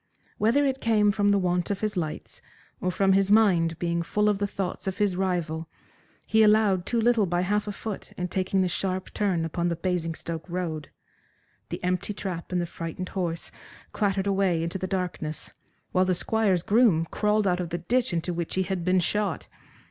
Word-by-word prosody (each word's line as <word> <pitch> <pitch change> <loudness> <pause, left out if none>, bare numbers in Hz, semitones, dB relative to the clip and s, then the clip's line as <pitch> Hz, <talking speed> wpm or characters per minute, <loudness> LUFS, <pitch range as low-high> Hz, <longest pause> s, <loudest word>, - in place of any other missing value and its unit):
Whether 240 +7 +3
it 270 -1 -1
came 210 -2 +3
from 205 0 +1
the 200 - +4
want 180 -2 0
of 200 -1 -2
his 215 -1 -1
lights, 160 -4 -4 0.4
or 185 - -1
from 195 +1 +3
his 195 0 +3
mind 180 -7 +4
being 170 -1 -1
full 210 +5 +1
of 205 -2 0
the 205 - 0
thoughts 195 -1 -4
of 190 - -2
his 205 -4 +1
rival, 170 -4 -2 0.6
he 220 - +3
allowed 210 -4 +4
too 235 - +1
little 225 -3 +3
by 175 0 0
half 205 +3 0
a - - -1
foot 205 0 -6
in 180 - -3
taking 190 +1 0
the - - +1
sharp 185 +2 -3
turn 185 -6 0
upon 170 +2 -1
the 170 - -1
Basingstoke 165 -1 -3
road. 165 -4 -3 0.8
The - - -5
empty 180 +3 -1
trap 185 -4 -5
and 180 - +1
the 175 - 0
frightened 170 +2 -6
horse 170 -3 -3 0.4
clattered 195 -2 0
away 190 -4 +1
into 170 +3 -3
the 185 - -2
darkness, 180 -5 -4 0.4
while 185 0 +3
the 185 -1 +2
Squire's 195 -3 +1
groom 210 -7 +4
crawled 210 0 +1
out 180 -2 +2
of 175 -2 -3
the 175 - -2
ditch 235 +9 0
into 175 +1 -1
which 170 -1 -3
he 190 - +2
had 185 -1 -3
been 185 +1 +3
shot. 205 +3 -1
185 Hz, 195 wpm, -26 LUFS, 175-205 Hz, 0.8 s, the